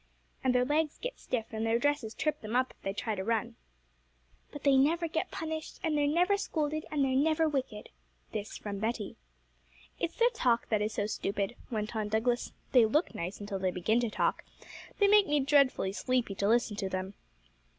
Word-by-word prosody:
'And 255 -1 +2
their 250 0 +4
legs 300 +2 0
get - - -5
stiff, 230 -3 -2
and 220 0 -3
their 225 +1 +2
dresses 270 -4 0
trip 305 -1 -1
them 215 +2 -4
up 255 +1 +2
if - - -24
they 195 - -2
try 220 +2 -2
to 190 -2 -3
run.' 230 +2 -1 1.0
'But 290 - -9
they 280 -1 +5
never 325 +6 +3
get 325 +3 -2
punished, 315 -1 -5
and 320 -2 +1
they're 290 -1 +2
never 355 +7 +3
scolded, 310 -6 -2
and 290 -3 +1
they're 265 - 0
never 315 +3 +3
wicked.' 260 -8 -3 0.4
This 215 -1 -5
from 200 -2 -5
Betty. 220 -1 -2 0.8
'It's 335 - -2
their 475 +1 +4
talk 245 - +1
that 215 -2 +2
is 210 +1 -1
so 205 - 0
stupid,' 200 +1 -2
went 215 -1 -3
on 215 -1 -1
Douglas; 230 +3 0 0.2
'they 240 -4 +6
look 300 +10 +1
nice 175 +3 -5
until 205 -1 -4
they 185 0 +1
begin 185 +6 +1
to 240 -2 0
talk; - - 0 0.5
they 405 - +4
make 415 0 +6
me 295 0 +2
dreadfully 270 -8 +3
sleepy 250 -1 0
to 200 +1 -1
listen 230 -1 +2
to 195 -3 -2
them.' 185 +1 -3
245 Hz, 200 wpm, -31 LUFS, 215-300 Hz, 1.0 s, they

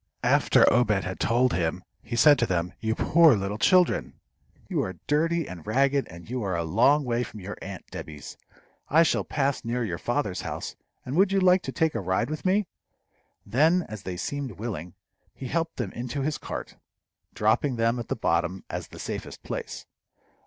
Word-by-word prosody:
After - - +4
Obed 105 -5 +2
had 90 0 -5
told 125 +2 +2
him, 85 +1 -1 0.2
he 120 - -5
said 145 +5 +6
to 120 - +2
them, 90 -1 -1
"You 110 0 -1
poor 160 -2 +5
little 100 +1 -3
children! 180 - +3 0.5
You - - 0
are 95 - -4
dirty 165 +2 +1
and 90 0 -9
ragged, 135 +4 +2
and 85 0 -12
you 125 +2 -3
are 95 -4 -1
a 85 - -1
long 120 - +3
way 120 -1 0
from 110 -2 -6
your 100 +2 -6
aunt 95 -1 -7
Debby's. 75 -2 -8 0.5
I 160 +3 +6
shall 165 - +1
pass 140 -2 -1
near 120 +1 -1
your 90 -5 -4
father's 120 -7 -1
house, - - -5 0.3
and 130 - -4
would 195 +1 +4
you 195 - +3
like 185 0 +5
to - - -5
take 160 -2 +1
a - - -2
ride 95 +8 -1
with 155 +2 -5
me?" 195 +3 +3 0.8
Then, 155 - +3
as 110 -2 -7
they 90 -1 -5
seemed 140 +4 -4
willing, 95 -6 -6 0.4
he 130 - -7
helped 165 0 -1
them 115 -7 -3
into 125 +3 -4
his 150 +1 -1
cart, - - -7 0.6
dropping 110 +5 +2
them 115 +1 +1
at 115 - -5
the - - -1
bottom 95 +1 0
as - - -4
the - - -13
safest - - -6
place. - - -6
120 Hz, 190 wpm, -26 LUFS, 95-150 Hz, 0.8 s, said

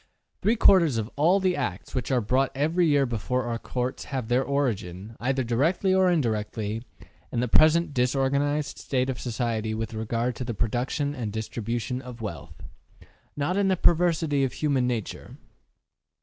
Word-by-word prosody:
Three 225 - +3
quarters 170 - +5
of 110 +1 -3
all 170 +7 +4
the 185 -2 +1
acts 105 -10 -4
which 125 -4 -2
are 130 -3 +2
brought 130 +5 +1
every 160 +5 +2
year 145 -2 +3
before 125 +2 -2
our 120 -1 -3
courts 125 +1 -3
have 130 -5 -4
their 125 +2 +3
origin, 110 -8 -2
either 130 +2 0
directly 155 +11 +1
or 190 -1 +4
indirectly, 110 -7 -1 0.5
in - - -1
the 125 - 0
present 155 +5 +4
disorganized 140 +3 0
state 130 -1 -1
of 125 - -7
society 115 -2 -2
with 115 +1 -4
regard 115 +2 -2
to - - -3
the 120 -2 -4
production 125 +7 -1
and 120 -7 -4
distribution 115 +3 -3
of 125 -2 -10
wealth 85 -11 -7 0.7
not 150 +6 0
in 200 -1 +2
the 190 -1 +2
perversity 165 -5 +2
of 130 - -1
human 140 -5 +1
nature. 115 -4 -4
130 Hz, 165 wpm, -26 LUFS, 115-145 Hz, 0.7 s, quarters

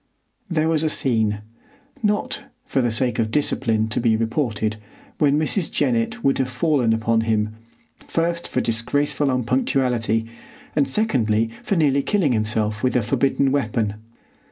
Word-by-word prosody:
There 160 -2 +1
was 160 -2 +2
a 160 - +1
scene, 110 -8 +1 0.6
not, 210 -1 -1 0.2
for 135 - 0
the 120 -1 +1
sake 120 +2 0
of 110 -1 +1
discipline, 115 -5 0
to - - -1
be 115 -2 +3
reported, 110 -2 -1 0.4
when 145 -1 +3
Mrs. 155 +3 -1
Jennett 235 -1 0
would 135 - +2
have 130 -1 0
fallen 130 -2 +1
upon 115 0 +2
him, 110 -1 0 0.5
first 170 +1 -2
for - - -1
disgraceful 145 +5 +1
unpunctuality, 125 -3 +1 0.5
and 145 -3 +3
secondly 115 - +1
for 200 - -1
nearly 140 -4 +3
killing 185 -4 +1
himself 105 -1 0
with 130 - +1
a 125 - +2
forbidden 135 +3 +1
weapon. 110 -6 0
125 Hz, 145 wpm, -22 LUFS, 110-150 Hz, 0.6 s, be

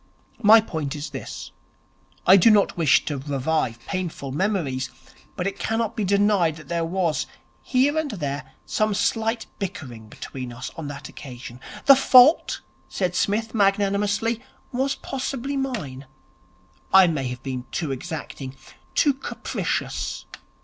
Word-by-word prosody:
My 220 0 +8
point 160 -8 -4
is 150 +1 -6
this. - - -7 0.7
I 185 - +8
do 195 +4 +7
not 210 -2 +4
wish 160 -5 +4
to 145 -3 -2
revive 135 -2 -1
painful 175 -7 -4
memories, 150 -6 -1 0.5
but 180 - -3
it 195 0 -3
cannot 225 0 -1
be 215 - -1
denied 200 -4 +3
that 155 -2 -13
there 170 -1 0
was, 165 -4 0 0.3
here 270 +3 +2
and 315 -2 -2
there, 140 - -4
some 215 -1 0
slight 225 +2 0
bickering 125 - -6
between 125 +2 -7
us 125 +2 -7
on 160 -3 -6
that 145 0 -7
occasion. 125 -2 -10 0.3
The 275 - +9
fault,' 260 +3 +6 0.3
said 180 -2 -1
Psmith 220 +4 0
magnanimously, 205 +2 +1 0.3
'was 270 +2 0
possibly 270 +1 -4
mine. 200 - -4 0.8
I 190 -1 +8
may 150 -6 -1
have 125 -1 -6
been 130 -2 -4
too 160 -5 -2
exacting, 135 -1 -6 0.4
too 290 -3 +4
capricious. 270 - -3
185 Hz, 135 wpm, -24 LUFS, 140-220 Hz, 0.8 s, The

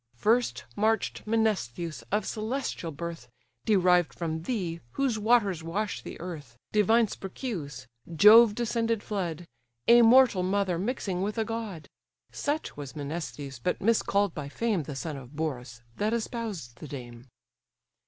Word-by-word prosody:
First 230 - +1
march'd 220 +2 +1
Menestheus, 185 - -1
of 210 0 +1
celestial 220 -5 -3
birth, 165 -4 -7 0.4
Derived 180 -4 +3
from 160 -2 -3
thee, 175 -5 -3
whose 260 -5 0
waters 205 -6 +3
wash 170 - -3
the - - -9
earth, 150 -9 -8
Divine 220 +2 +4
Sperchius! 180 - -6 0.3
Jove 210 +6 +8
descended 230 -2 0
flood! 175 -5 -3 0.4
A 240 0 +8
mortal 235 -4 +6
mother 185 -2 0
mixing 195 -4 -2
with 205 +3 -2
a 220 - +1
god. 220 -8 -5 0.4
Such 300 +2 -2
was 145 0 -8
Menestheus, 145 -3 -5
but 180 - -1
miscall'd 205 -3 +2
by 145 -2 -6
fame 215 +2 0
The 145 -1 -7
son 150 +2 -4
of 135 +2 -11
Borus, 125 -6 -4
that 215 +3 +1
espoused 220 - -4
the 155 - -8
dame. 120 -3 -9
190 Hz, 135 wpm, -28 LUFS, 155-225 Hz, 0.4 s, Jove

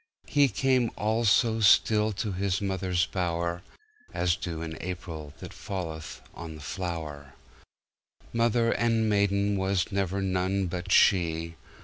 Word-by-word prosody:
He 145 -2 +4
came 130 +1 +1
all 110 +3 0
so 110 +2 +3
stillTo 105 0 +3
His 95 0 0
mother's 95 -3 0
bower, 85 -1 -2 0.5
As 85 -1 +2
dew 85 -2 -5
in 80 -1 -5
AprilThat 80 -5 -7
falleth 80 -5 -6
on 80 -2 -8
the - - -10
flower. 75 -5 -5 1.0
Mother 115 0 +2
and 115 -2 +1
maidenWas 100 -2 +1
never 100 -1 -1
none 95 0 0
but 90 +1 -4
she! 85 -4 +3
95 Hz, 115 wpm, -28 LUFS, 85-105 Hz, 1.0 s, He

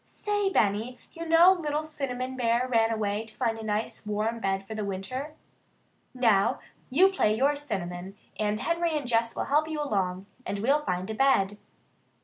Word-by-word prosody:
"Say, 410 -1 -1
Benny, 220 - +1
you 335 0 -7
know 340 +3 +7
little 305 -4 -2
Cinnamon 260 -4 -4
Bear 240 0 +1
ran 225 -3 +3
away 215 -1 -1
to 215 - -14
find 230 -3 -1
a - - -7
nice 215 0 -2
warm 215 +2 -2
bed 195 -2 -1
for 220 - -7
the 215 -1 -3
winter? 230 +10 -4 0.8
Now, 235 -2 +2 0.3
you 365 +9 +5
play 215 - +1
you're 280 +4 +3
Cinnamon, 195 -8 -4 0.2
and 210 0 0
Henry 335 -1 0
and 290 - -4
Jess 230 -1 +1
will - - -2
help 300 +2 +2
you 315 -1 -3
along, 190 -9 -1 0.2
and 200 - -3
we'll 275 +8 +2
find 180 +1 -2
a - - -3
bed." 210 -5 +2
230 Hz, 175 wpm, -28 LUFS, 210-290 Hz, 0.8 s, know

